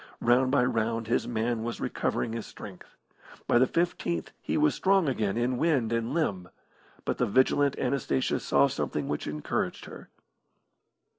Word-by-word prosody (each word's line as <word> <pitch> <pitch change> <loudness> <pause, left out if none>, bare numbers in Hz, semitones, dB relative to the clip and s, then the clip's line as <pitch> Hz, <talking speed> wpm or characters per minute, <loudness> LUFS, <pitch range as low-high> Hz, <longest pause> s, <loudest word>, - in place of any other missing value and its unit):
Round 125 +2 +3
by 135 -2 +3
round 115 -1 -1
his 115 - 0
man 115 0 -1
was 115 -1 -4
recovering 115 - -2
his 115 -1 -5
strength. - - -11 0.5
By 120 - +4
the 130 - +4
fifteenth 105 - -1
he - - -1
was 75 - +3
strong 195 -3 +2
again 110 -6 0
in 120 +1 0
wind 135 -9 +1
and 115 +1 -1
limb. 100 - -1 0.6
But - - -2
the - - +2
vigilant 130 +4 +3
Anastasia 125 - 0
saw 70 0 +3
something 75 -2 -3
which 75 - -3
encouraged 75 0 -3
her. - - -11
120 Hz, 155 wpm, -28 LUFS, 105-130 Hz, 0.6 s, By